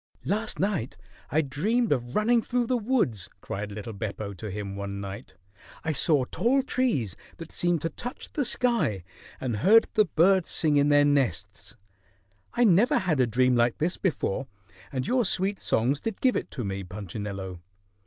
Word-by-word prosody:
"Last 215 0 -1
night 180 - -1 0.3
I 155 - +2
dreamed 200 - 0
of 120 -3 -1
running 230 +2 +3
through 245 +1 0
the 255 - 0
woods," 215 - 0
cried 105 +1 -5
little 105 +2 -6
Beppo 100 0 -5
to 105 +3 -7
him 100 0 -5
one 100 0 -5
night. 100 0 -8 0.5
"I 160 - 0
saw 145 -2 +3
tall 260 - +1
trees 220 - 0 0.2
that 165 -1 -9
seemed 175 -3 +1
to 165 - -1
touch 245 +1 -7
the 290 - 0
sky 235 - 0 0.4
and 120 -5 -2
heard 215 - +5
the 215 -2 +4
birds 180 +3 +3
sing 150 -3 +2
in 145 +1 +4
their 145 0 +5
nests. 140 -10 -1 0.8
I 245 - +3
never 210 +2 +5
had 170 -7 0
a 125 - +4
dream 125 +2 +3
like 120 0 +2
this 170 +4 -1
before, 135 - -1 0.4
and 130 -1 -2
your 250 - +2
sweet 195 -1 0
songs 130 +6 +1
did 225 -3 -4
give 255 -1 +3
it - - -2
to 125 - -5
me, 100 -1 -3
Punchinello. 95 -1 -6
145 Hz, 175 wpm, -27 LUFS, -, 0.8 s, heard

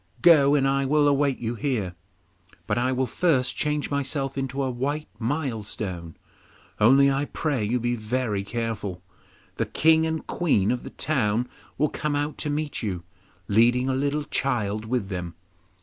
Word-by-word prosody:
Go, 145 -4 +7
and 135 -2 +3
I 140 0 +1
will 145 +2 +3
await 140 -1 +2
you 115 0 -3
here, 115 -8 -2 0.7
but - - 0
I 125 +2 +1
will 130 0 +1
first 130 -1 +1
change 150 -1 -1
myself 140 -1 -2
into 135 0 -2
a 130 - -1
white 145 +5 -2
milestone; 110 - -3 0.6
only 135 +5 +6
I 135 +1 0
pray 145 -6 -2
you 120 +4 0
be 120 +1 0
very 110 -2 -2
careful. 105 -5 -4 0.5
The - - 0
King 160 0 +4
and 160 0 -3
Queen 125 - +1
of 125 - -2
the - - -7
town 120 -5 0 0.3
will 150 +1 +2
come 150 +1 -2
out 145 +1 -2
to 150 - 0
meet 145 0 -2
you, 95 -6 -3 0.4
leading 120 +5 +3
a - - +1
little 145 +2 0
child 110 -7 -1
with 115 -4 -1
them. 90 -3 -5
130 Hz, 165 wpm, -25 LUFS, 110-145 Hz, 0.7 s, Go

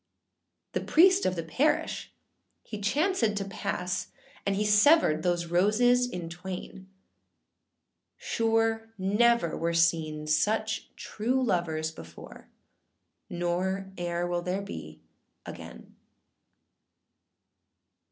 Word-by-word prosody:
The - - -2
priest 375 +4 +4
of 185 - 0
the 165 - -3
parish 260 - 0 0.5
he 215 - -7
chancèd 235 - +1
to 200 -1 -2
pass, 180 -1 -3 0.4
And 200 - +1
he 210 +2 0
severed 210 - +5
those 175 0 0
roses 220 +8 +3
in 180 -6 -5
twain. 185 +2 -8 1.3
Sure 225 0 0
never 205 -1 +2
were 170 0 -1
seen 160 -2 +1
such 215 +8 0
true 250 +5 -1
lovers 160 -7 -1
before, 80 - -12 0.8
Nor 185 +3 -2
eâer 175 -1 -2
will 175 0 -1
there 185 +3 -2
be 200 - -9 0.4
again. - - -10
190 Hz, 100 wpm, -28 LUFS, 175-225 Hz, 1.3 s, severed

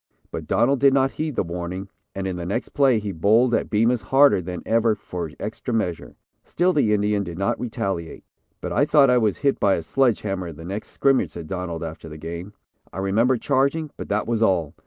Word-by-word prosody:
But - - -6
Donald 135 +3 +2
did 135 0 +5
not 135 0 +3
heed 155 -3 -4
the - - +1
warning, 90 +2 -5 0.3
and 95 0 -3
in 95 -1 -2
the 90 - -5
next 115 +6 -2
play 135 -5 +3
he 105 -2 -3
bowled 110 +8 +3
at - - 0
Bemus 115 +2 +2
harder 135 -7 +4
than 90 0 -6
ever 115 -1 +2
for 90 -4 -6
extra 110 +3 -4
measure. 90 -7 -3 0.3
Still 180 +2 +1
the 150 - +3
big 110 - +1
Indian 105 -1 +1
did 85 -3 -7
not 100 +1 -1
retaliate. 95 -8 -4 0.4
"But - - -4
I - - +3
thought 145 -3 +5
I 125 - +4
was 105 -4 +1
hit 140 -1 +1
by 100 - +3
a 85 - -4
sledge 120 +6 +1
hammer 95 -3 -3
in 80 - -8
the 80 - -10
next 100 +4 -5
scrimmage," 135 -1 +2
said 85 -2 -8
Donald 85 -2 -4
after 80 0 -7
the 75 - -9
game. 85 +5 -7 0.4
"I - - -10
remember 110 +7 +2
charging, 140 +4 0
but - - -8
that 105 +1 0
was 115 -1 -1
all. 90 -9 +2
105 Hz, 220 wpm, -23 LUFS, 90-125 Hz, 0.4 s, did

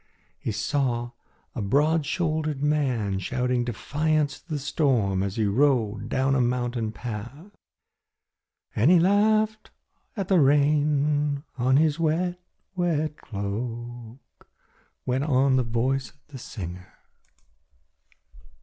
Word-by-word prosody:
He - - -3
saw 120 -1 -1 0.4
a 120 - -4
broad 145 +8 +2
shouldered 155 -4 -1
man 125 -10 0
shouting 125 +4 -1
defiance 150 +5 -1
to - - -32
the 155 - -1
storm 130 - +1
as 100 0 -2
he 110 - +1
rode 115 -1 +1
down 135 +1 +1
a 135 - +3
mountain 120 -2 -1
path. 125 - -7 1.2
"And 115 +8 +4
he 180 -1 +7
laughed 215 +4 +2 0.5
at 195 -3 -2
the 190 -2 +4
rain 145 0 +2
on 130 +1 +3
his 155 +1 +2
wet, 175 +3 0 0.4
wet 155 -4 0
cloak," 115 +4 -7 0.6
went 130 +2 0
on 135 -2 +3
the 130 - +2
voice 125 +3 -1
of - - -25
the 135 -3 -9
singer. 90 -5 -8
135 Hz, 115 wpm, -25 LUFS, 120-155 Hz, 1.2 s, he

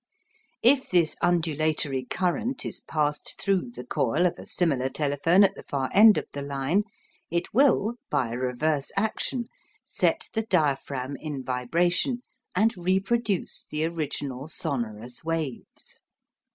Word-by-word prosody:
If 265 +2 +4
this 170 -4 +2
undulatory 155 -5 +1
current 190 - -1
is - - -2
passed 150 -1 -2
through 190 -9 0
the 125 - -6
coil 125 +6 +1
of 180 - 0
a - - -10
similar 135 -7 +1
telephone 150 +7 +3
at 195 0 +4
the - - -10
far 135 -2 -3
end 215 +1 +8
of - - -1
the 145 - -4
line, 140 +8 0 0.4
it 170 +1 -2
will, 240 -3 +3
by 125 -4 0
a - - -3
reverse 135 +3 -1
action, 220 +3 0 0.4
set - - 0
the 220 - +1
diaphragm 140 - -1
in 145 -4 -5
vibration 175 - +1 0.3
and 220 +5 +3
reproduce 195 +3 -1
the 155 +1 -1
original 145 -4 -4
sonorous 120 -6 -4
waves. 160 -6 -5
160 Hz, 135 wpm, -26 LUFS, 135-190 Hz, 0.4 s, end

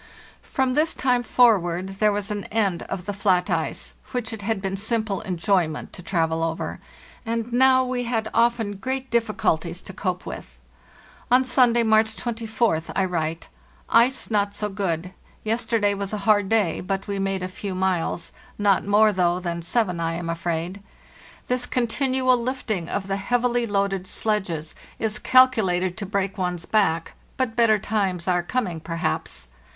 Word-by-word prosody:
From 260 -1 -1
this 310 +4 +2
time 250 -2 +2
forward 190 -7 +3
there 215 -1 +4
was 205 +1 -3
an 205 -1 -3
end 200 -6 0
of 180 - -4
the 205 - -3
flat 185 -3 +1
ice, - - -2 0.2
which 240 -2 -2
it 220 - -6
had 215 0 -1
been 195 0 -3
simple 220 0 -1
enjoyment 180 -4 -1
to - - -9
travel 165 -3 0
over; 165 0 -3 0.4
and 230 0 -3
now 260 +1 +5
we 250 -1 -2
had 225 -2 -1
often 230 -3 +1
great 265 +4 -4
difficulties 190 -7 0
to 190 - -9
cope 185 -1 -3
with. - - -8 0.7
On 250 +1 +5
Sunday, 245 -2 +4
March 220 0 +3
24th, 225 -7 -1
I 195 - +2
write: 165 -2 -2 0.4
"Ice 240 +2 +3
not 205 -1 +1
so 210 0 -2
good; 185 -3 -2 0.3
yesterday 225 -2 +1
was 200 0 -4
a - - 0
hard 205 -3 +4
day, 210 -7 +2
but 195 +1 -3
we 200 -1 -2
made 195 -1 -1
a - - -1
few 190 +1 -6
miles—not 190 +2 -1
more, 210 +2 +4
though, 180 -2 +1
than 170 -1 -3
seven, 180 0 0
I 165 0 -1
am 165 0 -3
afraid. 170 +3 -3 0.6
This 250 0 -1
continual 255 +1 +2
lifting 235 -8 -3
of 200 - -2
the 195 0 -1
heavily 240 +3 +1
loaded 195 -2 0
sledges 185 -8 -2 0.2
is 215 -1 -1
calculated 210 -9 +4
to 205 -3 -4
break 195 0 -2
one's 180 -2 -2
back; 170 -6 +1 0.2
but 255 -4 -1
better 230 -2 +4
times 195 -4 -1
are 175 -1 +2
coming, 180 -3 -2
perhaps. 80 - -3
205 Hz, 160 wpm, -24 LUFS, 180-230 Hz, 0.7 s, now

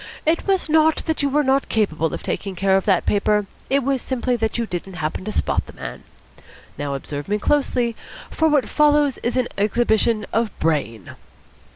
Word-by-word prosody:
It 325 +5 +1
was 385 -3 +1
not 315 0 +3
that 320 -1 -1
you 285 - +1
were 295 +2 +2
not 270 0 +1
capable 165 -7 0
of - - -6
taking 195 -2 -3
care 190 +1 +2
of 195 - +1
that 190 -4 +2
paper: 210 0 +2 0.2
it 275 0 +2
was 270 -1 0
simply 255 -1 -1
that 225 -1 -1
you 235 - 0
didn't 180 -1 -6
happen 160 +2 -3
to 215 - -3
spot - - 0
the - - -11
man. - - -8 0.7
Now 145 -1 -3
observe 145 +1 -6
me 205 +1 +1
closely, 245 -2 +1 0.4
for 320 - +2
what 290 -6 +2
follows 295 -3 +3
is 240 +2 -2
an 250 -1 +1
exhibition 220 0 +2
of 225 -3 -1
Brain." 125 - -1
225 Hz, 190 wpm, -21 LUFS, 195-275 Hz, 0.7 s, not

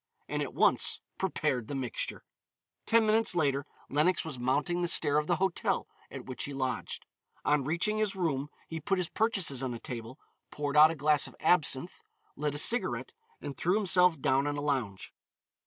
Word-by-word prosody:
And - - -2
at - - -5
once - - +3 0.2
prepared 150 - -1
the 140 - -5
mixture. 130 -3 -4 0.6
Ten 230 -1 +4
minutes 215 -2 +3
later 140 -4 0 0.2
Lenox 160 +6 +1
was 145 -6 -6
mounting 145 +8 0
the 175 - 0
stair 145 -3 +4
of 150 - -4
the 175 - +2
hotel 190 +1 -1 0.2
at - - -9
which 130 - -4
he 140 - -6
lodged. 130 -1 -4 0.4
On 145 -1 +2
reaching 170 +9 0
his 210 -2 0
room 150 -6 -2 0.2
he 160 - -5
put 195 +4 -1
his 180 -2 -2
purchases 195 - 0
on 130 -2 -3
a - - -8
table, 115 +2 -7 0.3
poured 145 -1 -4
out 155 +1 +8
a 165 - -3
glass 150 0 +2
of - - -14
absinthe, 155 -1 +1 0.3
lit 150 0 -2
a - - -2
cigarette, 235 +11 +1 0.3
and 140 - -6
threw 180 +3 0
himself 180 -5 +4
down 135 +2 +1
on 145 0 -2
a - - -3
lounge. 130 -10 -3
150 Hz, 185 wpm, -30 LUFS, 135-180 Hz, 0.6 s, out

